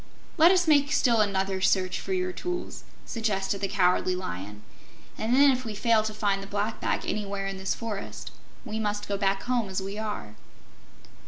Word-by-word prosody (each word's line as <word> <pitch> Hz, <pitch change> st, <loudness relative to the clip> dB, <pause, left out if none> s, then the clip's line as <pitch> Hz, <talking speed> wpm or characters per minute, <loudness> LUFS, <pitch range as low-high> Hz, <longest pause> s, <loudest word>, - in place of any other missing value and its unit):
"Let 330 Hz, 0 st, +7 dB
us 360 Hz, -2 st, +3 dB
make 290 Hz, -2 st, +4 dB
still 235 Hz, -7 st, +3 dB
another 195 Hz, -2 st, 0 dB
search 185 Hz, -1 st, +2 dB
for -, -, -6 dB
your 185 Hz, -1 st, 0 dB
tools," 355 Hz, -, -5 dB, 0.2 s
suggested 200 Hz, -3 st, -1 dB
the 195 Hz, -, +1 dB
Cowardly 185 Hz, -2 st, +2 dB
Lion, 105 Hz, -, -6 dB, 0.5 s
"and 230 Hz, +3 st, 0 dB
then, 280 Hz, +1 st, +7 dB
if 255 Hz, -1 st, -1 dB
we 220 Hz, -3 st, -5 dB
fail 225 Hz, +1 st, +3 dB
to 215 Hz, 0 st, -3 dB
find 205 Hz, -2 st, 0 dB
the 195 Hz, -, -8 dB
Black 205 Hz, +2 st, -2 dB
Bag -, -, -1 dB
anywhere 200 Hz, -1 st, -2 dB
in 195 Hz, 0 st, -4 dB
this 190 Hz, 0 st, -2 dB
forest, 220 Hz, -4 st, -6 dB, 0.3 s
we 220 Hz, -, -4 dB
must 205 Hz, -1 st, -2 dB
go 200 Hz, -, -1 dB
back 195 Hz, -1 st, 0 dB
home 245 Hz, -5 st, 0 dB
as 190 Hz, -, -2 dB
we 195 Hz, +2 st, -5 dB
are." 210 Hz, -, -5 dB
205 Hz, 185 wpm, -27 LUFS, 195-225 Hz, 0.5 s, Let